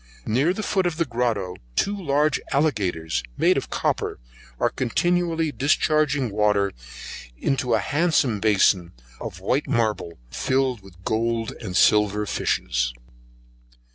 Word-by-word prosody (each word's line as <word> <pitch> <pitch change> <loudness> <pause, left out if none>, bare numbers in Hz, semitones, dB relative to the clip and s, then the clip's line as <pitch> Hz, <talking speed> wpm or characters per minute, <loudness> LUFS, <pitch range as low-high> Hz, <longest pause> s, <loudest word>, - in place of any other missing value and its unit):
Near 135 +10 +2
the 215 +4 -3
foot 190 -3 +1
of 165 -2 -3
the 170 - +1
grotto 115 -8 -1 0.2
two 200 - +1
large 150 -5 +1
aligators, 100 - 0 0.2
made - - +4
of - - -2
copper, - - -1 0.4
are - - +2
continually 165 +4 0
discharging 145 -3 +1
water 105 -1 +2 0.7
into 125 - +1
a - - +2
handsome 140 - +1
bason 95 -4 +3 0.3
of 90 - -7
white 130 +10 0
marble, 110 - -1
filled 130 - 0
with 95 -2 -17
gold 115 0 0
and 90 - -3
silver 105 0 +4
fishes. - - -1
115 Hz, 125 wpm, -24 LUFS, 100-150 Hz, 0.7 s, made